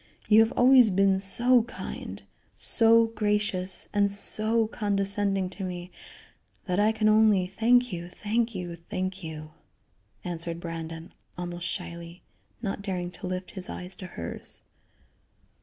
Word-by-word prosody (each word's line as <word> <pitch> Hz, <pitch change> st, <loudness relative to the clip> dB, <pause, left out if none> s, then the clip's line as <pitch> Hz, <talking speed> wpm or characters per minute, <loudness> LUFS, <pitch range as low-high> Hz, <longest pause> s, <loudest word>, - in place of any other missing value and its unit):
You 215 Hz, 0 st, +6 dB
have 225 Hz, +1 st, +4 dB
always 250 Hz, -2 st, +6 dB
been 195 Hz, 0 st, +3 dB
so 240 Hz, +6 st, +6 dB
kind, 235 Hz, +2 st, -8 dB, 0.3 s
so 230 Hz, 0 st, +4 dB
gracious 210 Hz, -4 st, 0 dB
and 205 Hz, -1 st, +3 dB
so 215 Hz, +3 st, 0 dB
condescending 200 Hz, -2 st, 0 dB
to 190 Hz, +1 st, -7 dB
me 180 Hz, -1 st, -6 dB, 0.7 s
that 180 Hz, 0 st, -1 dB
I 210 Hz, +1 st, +4 dB
can 220 Hz, -1 st, 0 dB
only 215 Hz, -3 st, +4 dB
thank 230 Hz, +4 st, +2 dB
you, 175 Hz, 0 st, -6 dB
thank 225 Hz, +4 st, -2 dB
you, 175 Hz, -2 st, -5 dB
thank 185 Hz, +3 st, -5 dB
you," 155 Hz, -1 st, -8 dB, 0.7 s
answered 170 Hz, -2 st, -4 dB
Brandon, 165 Hz, 0 st, -7 dB, 0.2 s
almost 175 Hz, 0 st, -5 dB
shyly; 170 Hz, -1 st, -7 dB, 0.4 s
not 200 Hz, -1 st, -3 dB
daring 180 Hz, -3 st, -4 dB
to 180 Hz, -, -8 dB
lift 185 Hz, 0 st, -5 dB
his 185 Hz, -2 st, -7 dB
eyes 180 Hz, +1 st, -6 dB
to 185 Hz, -, -8 dB
hers. 85 Hz, -, -8 dB
195 Hz, 135 wpm, -27 LUFS, 180-215 Hz, 0.7 s, You